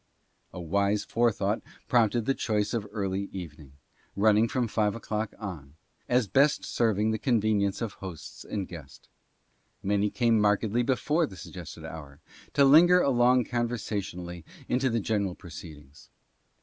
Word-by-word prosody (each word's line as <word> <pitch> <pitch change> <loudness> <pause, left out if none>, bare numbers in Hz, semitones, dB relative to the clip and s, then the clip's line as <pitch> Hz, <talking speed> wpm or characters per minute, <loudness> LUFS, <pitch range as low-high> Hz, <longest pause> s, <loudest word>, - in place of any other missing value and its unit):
A - - -8
wise 100 +4 0
forethought 115 -3 +1 0.3
prompted 115 -1 +2
the 135 - +2
choice 105 -4 -1
of 110 -3 -2
early 100 -2 -2
evening 75 -6 -9 0.3
— - - -36
running 110 +1 +5
from 120 +1 -1
five 105 -1 0
o'clock 110 -2 -4
on 80 -9 -8 0.2
— - - -40
as 125 -5 +1
best 140 +9 +3
serving 110 -2 +1
the 110 - -2
convenience 110 -4 +1
of 115 - -4
hosts 95 -5 -8
and 100 -3 -4
guest. 80 -6 -12 0.7
Many 100 +1 +1
came 115 0 +2
markedly 105 +3 +2
before 145 +6 +1
the 95 - -12
suggested - - -9
hour, 75 -3 -9 0.3
to 140 - +5
linger 175 +6 +7
along 125 -4 +4
conversationally 100 -8 -3 0.2
into 130 +1 +1
the 115 -1 0
general 100 -4 -1
proceed 80 -3 -10
ings. 70 0 -18
105 Hz, 150 wpm, -28 LUFS, 95-120 Hz, 0.7 s, linger